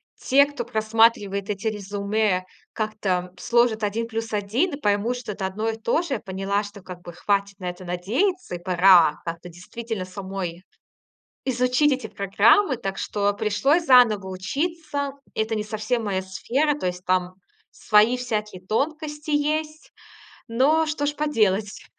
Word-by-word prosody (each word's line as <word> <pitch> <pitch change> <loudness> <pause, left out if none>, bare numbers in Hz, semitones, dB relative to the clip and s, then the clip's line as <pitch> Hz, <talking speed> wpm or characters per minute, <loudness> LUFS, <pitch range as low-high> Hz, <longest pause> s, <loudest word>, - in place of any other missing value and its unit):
те, 280 +2 +4
кто 285 -4 -5
просматривает 220 -3 +1
эти 210 +2 -3
резюме, 200 -2 -1 0.3
как-то 195 -5 -2
сложат 235 -2 +2
1 225 +3 -1
плюс 225 0 -4
1 230 - 0
и 280 - -12
поймут, 210 +3 0
что 235 -4 -6
это 190 -1 -3
одно 215 +4 -2
и 225 - -2
то 230 +8 +1
же, 270 -8 -2
поняла, 195 +1 -2
что, 205 -1 -10
как 180 -1 -10
бы, 175 -1 -10
хватит 200 +1 -1
на 180 - -3
это 180 +1 -9
надеяться 225 - -1
и - - -6
пора 180 -3 +5
как-то 170 +1 -6
действительно 195 +3 -6
самой 185 -2 -6 0.8
изучить 250 +3 +2
эти 255 -4 -2
программы. 220 - +3
Так 195 -4 -4
что 205 -1 0
пришлось 220 +11 +1
заново 235 -8 +5
учиться. 285 - -3 0.2
Это 220 +1 -1
не 215 - -1
совсем 215 +2 -2
моя 190 -2 -1
сфера, 265 +11 0
то 185 - -3
есть 180 0 -4
там 185 0 0 0.4
свои 215 +4 +3
всякие 215 -6 -4
тонкости 300 +5 -2
есть. 305 +1 -1 0.6
Но 280 +7 +3
что 300 -1 -2
ж 295 - 0
поделать? 215 -9 0
215 Hz, 150 wpm, -24 LUFS, 195-255 Hz, 0.8 s, пора